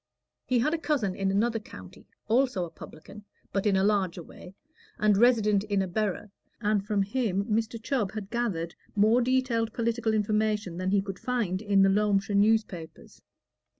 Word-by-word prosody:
He 255 - +2
had 250 +7 +1
a 330 - -1
cousin 270 - 0
in 195 0 -1
another 225 +4 +1
county, 210 - -13 0.2
also 235 -5 +1
a 165 - -11
publican, 200 +7 -12 0.3
but 195 +1 0
in 200 - +3
a 190 - +2
larger 195 -4 0
way, 180 +4 -13 0.4
and 210 -1 +3
resident 215 -3 +3
in 200 -2 0
a - - -3
borough, 205 +1 -2 0.3
and 210 -2 +1
from 205 -1 0
him 200 -2 -1
Mr. 225 +1 -1
Chubb 225 -4 -2
had 210 -2 -6
gathered 190 -9 -2 0.2
more 215 +4 +4
detailed 245 -3 0
political 230 -1 0
information 210 -3 0
than 185 +1 -2
he 195 0 +2
could 195 -2 -7
find 220 -7 -1
in 200 -2 +3
the 195 - +5
Loamshire 205 0 +1
newspapers. 200 -6 0
210 Hz, 170 wpm, -27 LUFS, 195-230 Hz, 0.4 s, the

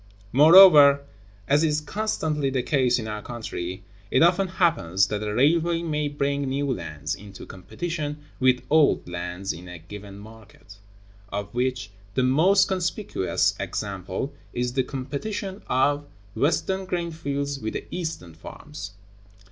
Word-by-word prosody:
(134) 140 +4 +4 0.4
Moreover, 140 0 +5 0.4
as 145 +3 +3
is 150 -1 +2
constantly 155 -6 -2
the 130 -2 -1
case 130 -3 +2
in 110 -3 -4
our 105 -1 -4
country, 95 -6 -6 0.3
it - - +4
often 180 +3 +3
happens 160 - +2
that 105 0 -2
a 105 -1 -2
railway 165 +7 +2
may 150 -2 -1
bring 140 0 -1
new 140 0 -1
lands 80 - -5
into 100 0 -10
competition 150 - -5 0.2
with 130 -1 +3
old 155 - +4
lands 90 +2 -4
in 90 +3 -11
a 90 -1 -8
given 100 +4 -10
market; 105 -1 -15 0.5
of 100 0 -5
which 125 -3 -2 0.2
the 130 - +2
most 170 +10 +4
conspicuous 185 - 0
example 100 +6 -4 0.2
is 125 0 -2
the 130 - +2
competition 150 +10 -5
of 145 +3 +1 0.3
Western 190 +5 0
grain 175 -2 -2
fields 140 -3 -3
with 110 -3 -4
the - - -5
Eastern 160 - -5
farms. 150 - -10
135 Hz, 140 wpm, -25 LUFS, 105-155 Hz, 0.5 s, Moreover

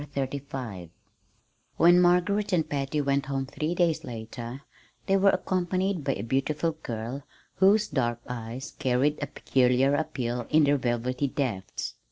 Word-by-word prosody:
CHAPTER 140 0 -1
XXXV 115 - -7 0.9
When 175 +2 +6
Margaret 185 +4 +2
and 165 -3 +2
Patty 140 +1 -1
went 140 0 0
home 135 -1 -1
three 155 +5 -3
days 170 -3 +1
later 120 +2 -7 0.4
they 195 - +2
were 195 0 +5
accompanied 185 -1 0
by 135 - +1
a 100 - -5
beautiful 135 +7 0
girl, 125 -3 -5 0.4
whose 205 +3 +5
dark 120 -4 0
eyes 125 +3 -6
carried 135 +2 +1
a 145 - -1
peculiar 130 0 +2
appeal 125 -5 -2
in 155 0 +5
their 145 0 +4
velvety 125 +2 -1
depths. 120 -9 -3
140 Hz, 145 wpm, -27 LUFS, 125-165 Hz, 0.9 s, When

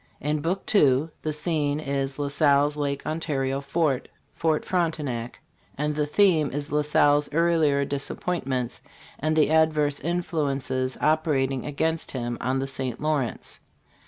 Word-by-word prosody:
In 150 +1 -1
Book 180 +5 -1
II 145 -5 +4
the 155 - -2
scene 150 -1 0
is 135 -2 -2
La 145 -1 -1
Salle's 145 0 +3
Lake 140 -1 -2
Ontario 140 -4 -1
fort, 140 -1 0 0.3
Ft. 160 -2 +1
Frontenac; 150 -10 -2 0.4
and 150 +1 0
the 150 0 -1
theme 160 -3 +3
is 145 +2 -5
La 150 0 +2
Salle's 145 0 +3
earlier 155 -3 +2
disappointments 135 -3 -2 0.4
and 155 +1 0
the 155 -1 +3
adverse 155 -2 +3
influences 140 -6 -1
operating 150 -4 +1
against 160 +3 -1
him 120 -2 -3
on 130 +2 0
the 135 - -1
St. 130 -3 -4
Lawrence. 150 -5 -2
145 Hz, 135 wpm, -25 LUFS, 135-155 Hz, 0.4 s, II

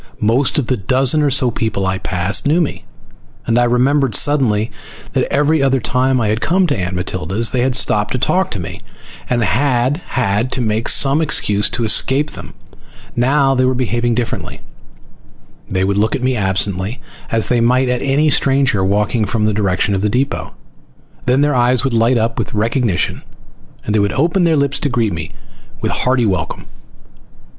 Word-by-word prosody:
Most 120 +5 +1
of 145 - +1
the 130 +1 -1
dozen 130 +8 +1
or 145 - +2
so 125 -2 +2
people 110 -4 -2
I 95 0 -1
passed 95 +6 0
knew 155 +4 +2
me, 155 - -3 0.6
and 115 +1 +1
I 120 - +3
remembered 125 0 +2
suddenly 115 -7 +2 0.4
that - - -1
every 145 +2 +2
other 135 -1 +2
time 130 +2 +1
I 110 -3 0
had 110 +2 -1
come 185 +3 +2
to 150 - 0
Aunt 95 -2 -3
Matilda's 95 +4 -2
they 125 - 0
had 130 0 0
stopped 105 -4 +1
to - - -1
talk 185 +9 0
with 95 - -4
me - - -8 0.5
and 120 -1 +1
I - - +1
had 130 +1 +1
had 115 0 -1
to - - -1
make 110 0 0
some 140 +3 +3
excuse 105 -9 +2
to 120 0 -2
escape 135 +6 +2
them. - - -11 0.6
Now 135 +3 +2
they 130 -1 +1
were 130 0 +1
behaving 120 -1 -1
differently. 120 -1 -4 1.1
They 95 -1 -1
would 100 +1 0
look 110 +5 +1
at 130 - -4
me 130 0 +1
absently 95 +1 -1 0.3
as 115 -1 +1
they 120 -1 +2
might 125 +2 +2
at 125 0 -1
any 145 +3 +1
stranger 135 -8 +1
walking 105 +3 0
from 105 +1 -1
the 110 - +1
direction 100 -1 0
of 95 - -1
the 105 - 0
depot, 130 +6 -2 0.7
then 130 +3 +3
their 145 0 +2
eyes 125 0 +2
would 135 -3 -1
light 115 +2 +2
up 115 0 -1
with - - -4
recognition 115 -3 -1 0.6
and 105 - -2
they 110 - +2
would 100 0 0
open 170 +5 +1
their 165 -2 +2
lips 140 -1 0
to 145 - -1
greet 115 -6 0
me 80 -1 -6 0.5
with - - -2
hearty 125 -2 +1
welcome. 95 -3 -3
120 Hz, 190 wpm, -16 LUFS, 105-135 Hz, 1.1 s, I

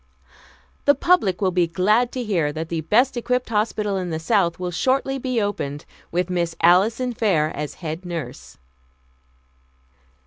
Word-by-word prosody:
"The 285 - +5
public 270 - +2
will 190 -2 +2
be 175 -1 +2
glad 210 +8 +2
to 255 - -3
hear 175 -9 0
that 160 +1 -5
the 165 -1 -2
best 240 - +2
equipped 250 +1 -1
hospital 210 -2 0
in 180 -2 -3
the 160 - -2
South 170 0 +1
will 180 -1 -4
shortly 270 +7 0
be 255 -2 -1
opened, 150 -9 -3 0.3
with 180 +1 0
Miss 170 -2 -2
Alison 220 +9 +3
Fair 190 -10 +1
as 150 0 -5
head 160 +1 -6
nurse." 170 -3 -7
185 Hz, 150 wpm, -22 LUFS, 170-235 Hz, 0.3 s, The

